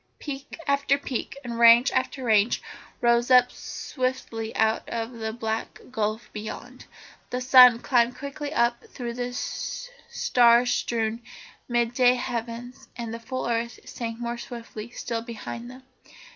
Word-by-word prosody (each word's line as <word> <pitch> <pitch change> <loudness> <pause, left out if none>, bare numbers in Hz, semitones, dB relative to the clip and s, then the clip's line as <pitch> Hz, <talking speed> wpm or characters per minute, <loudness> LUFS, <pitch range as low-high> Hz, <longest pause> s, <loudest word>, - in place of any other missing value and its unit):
Peak 280 -1 -7
after 280 -1 +2
peak 275 -1 -4
and 235 -2 -5
range 235 +2 +7
after 260 +1 -1
range 220 -1 +3 0.4
rose 235 0 +3
up 250 -1 +6
swiftly 255 -4 -4
out 220 0 +1
of 230 0 -3
the 220 -2 -4
black 220 -1 -4
gulf 215 -1 -2
beyond. 220 +4 -8 0.4
The 250 - -2
sun 250 -2 +8
climbed 245 -1 +2
quickly 285 +1 -5
up 235 -4 +1
through 240 -2 -6
the 245 +1 -3
star 250 - +1
strewn, 230 -2 -1 0.5
mid 240 -1 +1
day 250 0 +5
heavens, 245 0 -5
and 230 -2 -5
the 230 - -5
full 255 +2 -4
earth 235 0 -2
sank 230 -1 -5
more 235 0 -4
swiftly 235 -2 -8
still 235 -1 -4
behind 235 +1 -7
them. 255 +1 -12
240 Hz, 140 wpm, -26 LUFS, 230-255 Hz, 0.5 s, sun